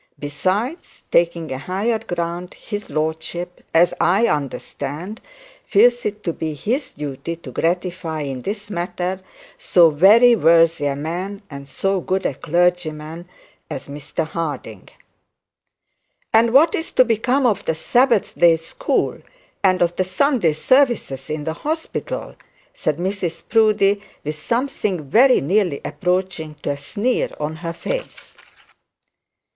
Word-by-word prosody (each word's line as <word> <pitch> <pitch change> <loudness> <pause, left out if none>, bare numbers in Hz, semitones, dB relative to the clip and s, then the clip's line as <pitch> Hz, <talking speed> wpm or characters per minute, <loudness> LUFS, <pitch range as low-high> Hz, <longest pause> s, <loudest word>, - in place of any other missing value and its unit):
Besides, 185 - -3
taking 170 -2 +1
a 130 - -3
higher 200 - -1
ground, 175 0 -4
his 205 -1 -6
lordship, 160 +4 -3
as 175 +2 +4
I 195 +6 +4
understood, 150 - -4 0.4
feels 240 +3 +4
it 210 0 -6
to 170 - -1
be 155 -1 -4
his 255 - -2
duty 145 +3 -5
to 160 -6 -11
gratify, 175 +1 -2
in 135 -3 -4
this 205 - -5
matter, 180 +1 -3 0.4
so 175 - +5
very 215 +10 +6
worthy 165 -5 +4
a 140 - -1
man 180 +7 -4
and 140 0 -8
so 195 +6 -1
good 190 +2 -1
a - - +1
clergyman 170 +1 -1 0.4
as 130 - -6
Mr 150 +3 -4
Harding.' 150 - -5 1.4
'And 225 +1 +5
what 300 +6 +5
is 325 - -3
to 255 - +5
become 250 +4 +1
of 220 -6 +2
the 160 - 0
Sabbath 240 +5 +2
day 170 -1 +6
school, 330 - -2 0.4
and 185 -2 +4
of 175 0 -1
the 185 - +2
Sunday 185 - +2
services 240 - +1
in 150 -1 -3
the 160 +1 -2
hospital?' 320 +2 -4 0.4
said 150 -1 -1
Mrs 175 -2 -3
Proudie, 210 -3 +3 0.2
with 150 - -3
something 210 - -2
very 255 +3 +6
nearly 180 -1 +1
approaching 180 -4 -2
to - - 0
a 140 - -3
sneer 215 - -1
on 155 +1 -3
her 165 0 -5
face. - - -6
175 Hz, 135 wpm, -21 LUFS, 155-215 Hz, 1.4 s, very